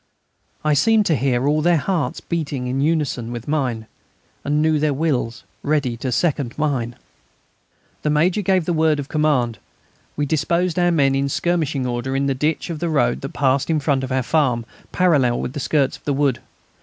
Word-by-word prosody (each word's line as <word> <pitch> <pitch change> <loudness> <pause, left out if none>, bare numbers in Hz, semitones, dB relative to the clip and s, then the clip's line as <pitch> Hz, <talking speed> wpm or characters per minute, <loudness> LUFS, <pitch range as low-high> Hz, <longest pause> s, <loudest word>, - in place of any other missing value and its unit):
I 150 - +3
seemed 215 +9 +3
to 165 - +2
hear 130 -1 +1
all 150 +1 +2
their 175 +1 +3
hearts 155 -4 -1
beating 145 -6 -3
in 130 +2 -1
unison 145 -6 0
with 120 -1 -6
mine; 130 -7 -1 0.6
and 150 +1 0
knew 155 0 +2
their 150 -1 +1
wills 130 -6 -1 0.2
ready 145 -5 0
to 130 +2 -3
second 130 0 0
mine. 130 -6 -1 1.1
The 150 - 0
Major 170 +7 +2
gave 185 -3 +1
the 175 - 0
word 160 -1 +2
of 145 -1 -5
command. 135 - +1 0.6
We 145 - +1
disposed 170 +4 0
our 175 0 +3
men 140 -5 +3
in 140 +1 0
skirmishing 155 -4 0
order 125 +2 -2
in 140 +1 +1
the 140 - +1
ditch 150 +5 -1
of 160 - -5
the 170 - -1
road 125 -6 +1
that 135 - -6
passed 135 +1 +1
in 160 -2 +2
front 140 -2 0
of 130 - -4
our 130 0 +1
farm, 125 -5 +1 0.3
parallel 145 -10 +2
with 125 - -4
the 145 - -4
skirts 140 0 +1
of - - -30
the 145 - 0
wood. 135 -3 +1
145 Hz, 195 wpm, -21 LUFS, 130-160 Hz, 1.1 s, I